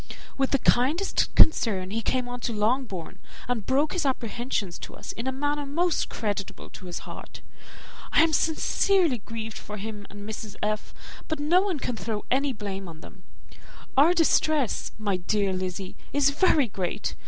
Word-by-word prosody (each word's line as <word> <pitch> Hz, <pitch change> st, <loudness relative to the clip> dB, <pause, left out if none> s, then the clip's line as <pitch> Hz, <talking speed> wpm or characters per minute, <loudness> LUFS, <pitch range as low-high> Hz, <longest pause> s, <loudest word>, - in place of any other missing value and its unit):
With 270 Hz, -1 st, +1 dB
the 275 Hz, -, +3 dB
kindest 285 Hz, +10 st, +2 dB
concern 195 Hz, -11 st, +4 dB
he 225 Hz, +2 st, -1 dB
came 250 Hz, +2 st, 0 dB
on 245 Hz, 0 st, -5 dB
to 235 Hz, -, -2 dB
Longbourn, 215 Hz, -5 st, -1 dB, 0.3 s
and 245 Hz, -4 st, -2 dB
broke 280 Hz, +4 st, +2 dB
his 360 Hz, -, 0 dB
apprehensions 235 Hz, -7 st, -2 dB
to -, -, -8 dB
us -, -, -6 dB
in 230 Hz, +3 st, -5 dB
a -, -, +1 dB
manner 290 Hz, +2 st, -1 dB
most 330 Hz, +4 st, 0 dB
creditable 205 Hz, -3 st, -4 dB
to 185 Hz, -, -10 dB
his 175 Hz, -, -6 dB
heart. -, -, -9 dB, 0.7 s
I -, -, +6 dB
am 325 Hz, -1 st, +2 dB
sincerely 325 Hz, -, +2 dB
grieved 225 Hz, +1 st, -6 dB
for 210 Hz, 0 st, -7 dB
him 210 Hz, 0 st, -6 dB
and 205 Hz, 0 st, -9 dB
Mrs. 215 Hz, -1 st, -6 dB
F.; 215 Hz, 0 st, -2 dB, 0.3 s
but 315 Hz, -2 st, -2 dB
no 330 Hz, +5 st, +4 dB
one 385 Hz, -5 st, -1 dB
can 250 Hz, -3 st, -3 dB
throw 220 Hz, -2 st, -4 dB
any 275 Hz, +2 st, +2 dB
blame 200 Hz, -4 st, -5 dB
on 165 Hz, -1 st, -10 dB
them. 190 Hz, -, -14 dB, 0.7 s
Our 310 Hz, +6 st, +6 dB
distress, 310 Hz, -, +2 dB
my 205 Hz, -3 st, 0 dB
dear 195 Hz, +1 st, 0 dB
Lizzy, 185 Hz, 0 st, -4 dB, 0.2 s
is 280 Hz, -1 st, +4 dB
very 295 Hz, -3 st, +4 dB
great. 180 Hz, -, -3 dB
240 Hz, 170 wpm, -27 LUFS, 205-290 Hz, 0.7 s, I